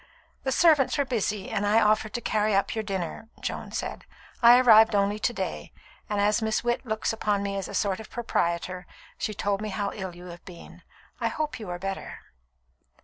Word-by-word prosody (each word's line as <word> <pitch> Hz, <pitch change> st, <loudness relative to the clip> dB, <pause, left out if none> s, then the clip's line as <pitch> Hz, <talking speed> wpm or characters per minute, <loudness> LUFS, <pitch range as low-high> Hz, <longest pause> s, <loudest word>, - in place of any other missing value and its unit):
"The 265 Hz, -, -2 dB
servants 300 Hz, -2 st, +4 dB
were 285 Hz, -, +2 dB
busy, 215 Hz, -5 st, -2 dB
and 200 Hz, -, -1 dB
I 210 Hz, +2 st, +4 dB
offered 215 Hz, 0 st, +2 dB
to 240 Hz, -, -3 dB
carry 215 Hz, -2 st, +1 dB
up 195 Hz, -, +1 dB
your 220 Hz, -, -2 dB
dinner," 195 Hz, +2 st, -4 dB
Joan -, -, -5 dB
said. -, -, -4 dB, 0.4 s
"I 240 Hz, +1 st, +9 dB
arrived 225 Hz, -3 st, +7 dB
only 200 Hz, +1 st, +1 dB
to 240 Hz, -, +1 dB
day; -, -, -5 dB, 0.4 s
and 210 Hz, -1 st, -1 dB
as 210 Hz, +2 st, +2 dB
Miss 220 Hz, 0 st, 0 dB
Witt 240 Hz, 0 st, 0 dB
looks 220 Hz, 0 st, -1 dB
upon 210 Hz, -2 st, 0 dB
me 200 Hz, 0 st, -2 dB
as 195 Hz, -1 st, -3 dB
a -, -, -7 dB
sort 200 Hz, -2 st, 0 dB
of 220 Hz, -, -10 dB
proprietor, 180 Hz, -5 st, -2 dB, 0.3 s
she 215 Hz, -, -2 dB
told 200 Hz, 0 st, -1 dB
me 215 Hz, -, -3 dB
how 200 Hz, 0 st, -2 dB
ill 190 Hz, -4 st, -6 dB
you 175 Hz, +1 st, -11 dB
have 175 Hz, 0 st, -10 dB
been. 175 Hz, -2 st, -12 dB, 0.4 s
I -, -, 0 dB
hope 305 Hz, -4 st, -3 dB
you 210 Hz, -4 st, -7 dB
are 175 Hz, -, -3 dB
better." 195 Hz, +1 st, -6 dB
210 Hz, 200 wpm, -26 LUFS, 195-225 Hz, 0.4 s, I